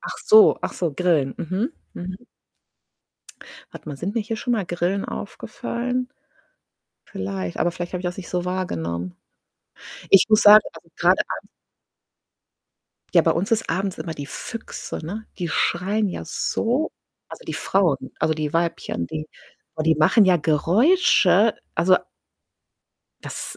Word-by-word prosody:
ach - - -7
so 430 -1 +7
ach - - -2
so 170 -4 -2
Grillen, 150 -4 +1
mhm 195 - -2 0.2
mhm. 185 +6 -8 1.4
Warte - - -11
mal, 145 - -5
sind 185 +9 -4
mir 230 - +1
hier 225 +1 -4
schon 245 +3 -2
mal 215 -5 0
Grillen 175 +3 -1
aufgefallen? 250 +1 -4 1.0
Vielleicht, 95 -2 -5
aber 175 - +2
vielleicht 175 0 -6
habe 180 - -3
ich - - -11
das 175 0 -3
nicht 190 - -8
so 180 -1 -2
wahrgenommen. 90 - -3 0.9
Ich 195 - +7
muss 215 0 +5
sagen, 210 +1 +9
also, - - -15
grade - - +4 0.2
abends - - -14 1.7
Ja, - - +8
bei - - +2
uns 190 +7 -2
ist 225 -1 +1
abends 190 +3 -2
immer 160 +1 -5
die 145 - -6
Füchse, 225 - -6
ne, 210 +7 -6
die 175 -2 -2
schreien 195 +6 0
ja 180 - -6
so 245 - -1 0.4
also, - - -11
die - - -4
Frauen 165 -9 0
also, 160 - +1
die 155 -1 -3
Weibchen, 165 - -1
die 155 - -6 0.5
oh, 155 - -1
die 160 0 +3
machen 155 +8 +5
ja 185 -2 +5
Geräusche. 210 - +3 0.2
Also - - +4 1.2
Das - - -6
180 Hz, 150 wpm, -23 LUFS, 155-215 Hz, 1.7 s, sagen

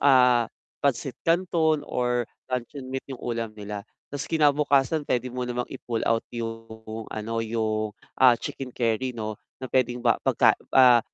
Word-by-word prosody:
ah, 125 -4 +5 0.3
pansit 135 -1 0
canton 165 -3 +2
or 125 -1 0 0.2
luncheon 130 +2 -4
meat 135 0 -4
yung 125 - -8
ulam 115 -2 -2
nila. 105 -1 -6 0.3
Tapos 140 -1 -4
kinabukasan 145 -1 +3
puwede 125 0 0
mo 125 0 -3
namang 125 0 -2
i-pull 120 -4 -3
out 115 0 +2
yung 115 -1 -6
ano, 115 +1 -3
yung, 110 -1 -1 0.3
ah, 130 -1 +8
chicken 130 -2 -5
curry 120 +2 0
'no 110 -2 -4 0.3
na - - -2
puwedeng 125 -1 +1
ba 115 - +3
pagka, - - +5 0.2
ah, 125 -2 +8
125 Hz, 150 wpm, -26 LUFS, 115-135 Hz, 0.3 s, ah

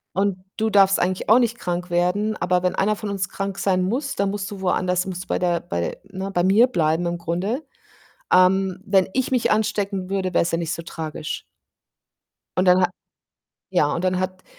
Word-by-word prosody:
Und 195 -1 +1 0.2
du 220 0 0
darfst 195 -2 +5
eigentlich 185 +1 -1
auch 220 +4 +6
nicht 235 -1 0
krank 180 0 -3
werden, 180 +5 +1
aber 180 +1 +1
wenn 180 - +1
einer 210 +2 +1
von 210 0 -6
uns 195 -2 -2
krank 195 0 -4
sein 185 -2 +1
muss, 255 +8 -2
dann 200 0 0
musst 200 -1 -4
du 200 -2 -8
woanders 180 -1 +1
musst 185 0 -6
bei - - 0
der 175 -1 +1
bei 85 0 -3
ne, 195 0 -6
bei 175 - +1
mir 210 +6 +5
bleiben 165 -7 +1
im 170 0 -1
Grunde. 185 - -2 0.7
Ähm, 185 0 +4
wenn 195 -2 +3
ich 260 0 0
mich 250 -3 +2
anstecken 200 -3 0
würde, 190 -2 -1
wär's 170 - +2
ja 165 - +1
nicht 165 -1 -3
so 165 - -3
tragisch. 160 -2 -5 1.2
Und 185 - +3
dann 180 0 +5
hat 180 - +2 0.8
ja, 145 0 +2
und 170 - -3
dann 185 0 +1
hat 185 0 -4
185 Hz, 200 wpm, -22 LUFS, 180-200 Hz, 1.2 s, auch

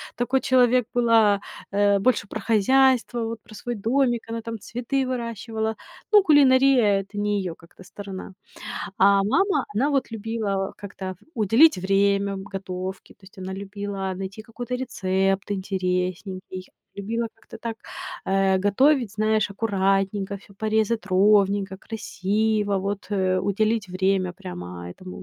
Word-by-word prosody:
такой 255 +2 0
человек 250 -1 +4
была, 225 -4 +4 0.3
э, 200 0 +3
больше 215 -1 +1
про 215 - -5
хозяйство, 240 +2 +3
вот 225 0 -5
про 215 - -15
свой 240 +3 -4
домик, 240 +2 +1
она 230 0 -3
там 230 0 -6
цветы 250 +5 -2
выращивала. 225 -3 -3 0.4
Ну, 415 -2 +7
кулинария- 260 - +5
это 195 +2 -11
не 205 0 0
её 180 -3 -4
как-то 170 +3 -17
сторона, 195 0 -8 0.7
а 200 0 +5
мама, 305 - +2
она 265 +8 +2
вот 275 -3 0
любила 210 -3 -2
как-то 190 -2 -7 0.2
уделить 225 +6 +5
время 200 +1 +1
готовке, 190 -1 -6
то - - -52
есть 190 0 -17
она 190 0 -5
любила 200 0 -4
найти 195 +3 -6
какой-то 245 +2 -6
рецепт 195 -5 -1
интересненький, 185 -1 -3 0.3
любила 225 +4 -3
как-то - - -13
так, 230 -1 -5 0.5
э, 195 0 +2
готовить, 235 +4 +3
знаешь, 215 0 +1
аккуратненько, 195 -1 0
всё 200 0 -17
порезать 220 +1 0
ровненько, 200 0 +3
красиво, 210 0 -1
вот, 200 +1 -3
э, 185 -2 +1
уделить 210 +2 0
время 185 0 0
прямо 90 - -8
этому 185 - -10
205 Hz, 135 wpm, -24 LUFS, 195-230 Hz, 0.7 s, Ну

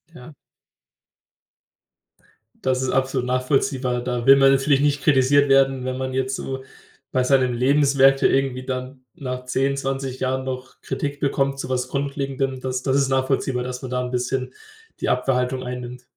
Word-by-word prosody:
Ja. 125 +5 -12 2.3
Das 130 -1 +1
ist 130 - -1
absolut 130 -1 0
nachvollziehbar. 130 -1 0
Da 120 -1 -3
will 135 - +9
man 135 0 +5
natürlich 135 +1 +3
nicht 145 -1 +1
kritisiert 140 +1 +4
werden, 135 -1 +3
wenn 130 0 -3
man 130 0 -3
jetzt 130 0 -1
so 130 0 -5 0.5
bei 130 - +1
seinen 130 -1 +2
Lebenswerke 135 +1 +4
irgendwie 135 -1 0
dann 130 0 -5
nach 125 -2 -6
10, 135 +2 0
20 135 -1 -3
Jahren 130 0 -1
noch 130 0 -7
Kritik 145 0 -4
bekommt 140 -1 0
zu - - -5
was 125 -1 -1
Grundlegendem. 135 -1 -2
Das 130 0 -3
das 135 0 +1
ist 135 -1 +2
nachvollziehbar, 130 -1 0
dass 125 0 -5
man 130 - -7
da 125 0 0
'n 125 0 -4
bisschen 130 +1 -2 0.5
die - - -1
Abwerhaltung 125 0 0
einnimmt. 125 0 -7
130 Hz, 160 wpm, -22 LUFS, 125-135 Hz, 2.3 s, will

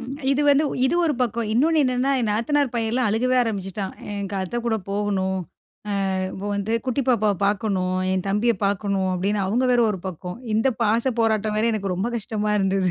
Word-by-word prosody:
ம். 245 +2 -7 0.2
இது 290 +2 +1
வந்து 285 +2 +4 0.2
இது 300 - 0
ஒரு 310 -3 +1
பக்கம். 235 -1 -1
இன்னொன்னு 310 +6 +3
என்னென்னா, 255 +1 +1
என் 230 - 0
நாத்தனார் 270 +4 +1
பையன்ல்லாம் 230 0 0
அழுகவே 250 +4 +1
ஆரம்பிச்சுட்டான். 195 -3 -3 0.2
"எனக்கு 200 -1 -4
அத்தை 190 +6 -3
கூட 225 - +2
போகணும். 195 -2 -1 0.7
ஆ, - - -1 0.2
இப்போ 195 +2 -6
வந்து 200 +2 -2
குட்டி 255 +2 0
பாப்பாவ 215 -4 +3
பாக்கணும், 190 -3 0
என் 190 0 -1
தம்பிய 215 +4 +2
பாக்கணும்." 195 -1 0
அப்படின்னு 200 +3 0
அவங்க 240 +7 +1
வேற 240 - +4
ஒரு 190 -4 -4
பக்கம். 180 +2 -7 0.2
இந்த 225 +5 +3
பாச 230 +4 +2
போராட்டம் 215 -1 +1
வேற 225 - +2
எனக்கு 195 -4 -2
ரொம்ப 200 +7 -2
கஷ்டமா 210 -1 -2
இருந்தது. 195 -1 +1
215 Hz, 180 wpm, -23 LUFS, 195-240 Hz, 0.7 s, வந்து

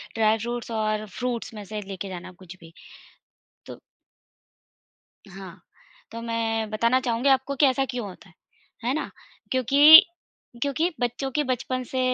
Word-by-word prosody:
Dry 220 0 +2
fruits 235 +1 -5
और 215 -1 -1
fruits 240 +2 -5
में 210 - -8
से 215 +2 -7
1 205 - -9
लेके 195 0 -7
जाना 185 0 -8
कुछ 180 +1 -11
भी। 165 -1 -16 0.9
तो - - -10 1.5
हाँ, 190 -1 -11 0.5
तो 230 - -6
मैं 225 -1 -2
बताना 235 +4 +1
चाहूँगी 245 +1 -1
आपको 270 +1 +2
कि 290 - +4
ऐसा 270 0 +1
क्यों 245 -4 -5
होता 190 +1 -14
है। 170 - -22 0.5
है 250 - 0
ना, 310 - -4 0.4
क्योंकि, 290 - +8 0.6
क्योंकि 300 +5 0
बच्चों 245 +3 -2
की 295 +3 0
बचपन 255 0 -2
से 260 - -1
230 Hz, 155 wpm, -24 LUFS, 215-260 Hz, 1.5 s, क्योंकि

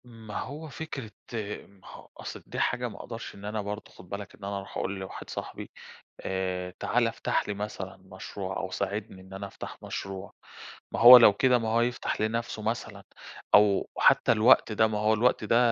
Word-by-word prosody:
ما 115 -3 -8
هو 150 +4 -6
فكرة 135 -6 -6 0.6
ما 100 -2 -20
هو - - -12
أصل - - -8
دي - - -6
حاجة 125 0 0
ما 105 - -11
أقدَرش 115 -1 -7
إن 100 - -11
أنا 105 +1 -2
برضه 105 +1 -6
خُد 90 - -15
بالك 100 -1 -7
إن 105 - -18
أنا 100 0 -3
أرُوح 100 0 -7
أقول 95 0 -2
لواحد 95 - -8
صاحبي - - -6 0.5
آآ، 90 -1 -3
تعالَ - - +2
افتح - - -1
لي 105 - -1
مثلًا 100 -2 -6
مشروع 95 0 -7
أو 95 - -4
ساعدني 100 0 -4
إن 95 +1 -14
أنا 100 +1 -5
أفتح - - -9
مشروع، 95 0 -6 0.6
ما - - -2
هو 125 +2 +12
لو 115 -4 +8
كده، 125 +4 +4
ما 115 -1 -2
هو 115 +1 +3
يفتح 120 -2 -1
لنفسه 110 0 -2
مثلًا 110 +2 -4 0.5
أو 105 -1 +4
حتى - - +5
الوقت 115 +1 +5
ده، 110 +1 +3
ما 110 -1 -2
هو 105 +1 +3
الوقت 115 +1 +2
ده 110 +2 +3
105 Hz, 190 wpm, -28 LUFS, 95-115 Hz, 0.6 s, هو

